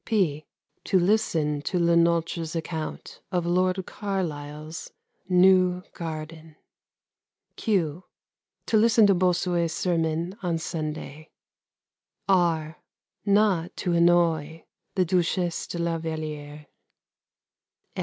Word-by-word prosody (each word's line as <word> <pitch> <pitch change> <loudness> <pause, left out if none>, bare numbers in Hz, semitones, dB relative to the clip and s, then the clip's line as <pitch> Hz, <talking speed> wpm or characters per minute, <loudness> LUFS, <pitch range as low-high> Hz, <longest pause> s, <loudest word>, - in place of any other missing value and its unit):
(p) 155 - 0 0.4
To 190 - +3
listen 165 -7 +1
to 180 - -2
Le 170 -1 +3
Nôtre's 170 -1 +1
account 160 -1 -5
of 175 -2 0
Lord 185 +1 +1
Carlisle's 155 -5 -5 0.4
new 180 0 +4
garden. 160 -1 -7 1.0
(q) 180 -6 -1 0.6
To 220 - +2
listen 225 0 +5
to 200 - +5
Bossuet's 175 -2 +1
sermon 170 0 -1
on 175 -3 -1
Sunday. 155 -1 -5 1.0
(r) 165 -5 +1 0.5
Not 200 -4 +2
to 175 - -1
annoy 170 -2 +2 0.3
the 185 -2 +2
Duchesse 175 0 0
de - - -5
La 170 -1 -1
Vallière. 150 -2 -6
170 Hz, 95 wpm, -26 LUFS, 160-185 Hz, 1.0 s, listen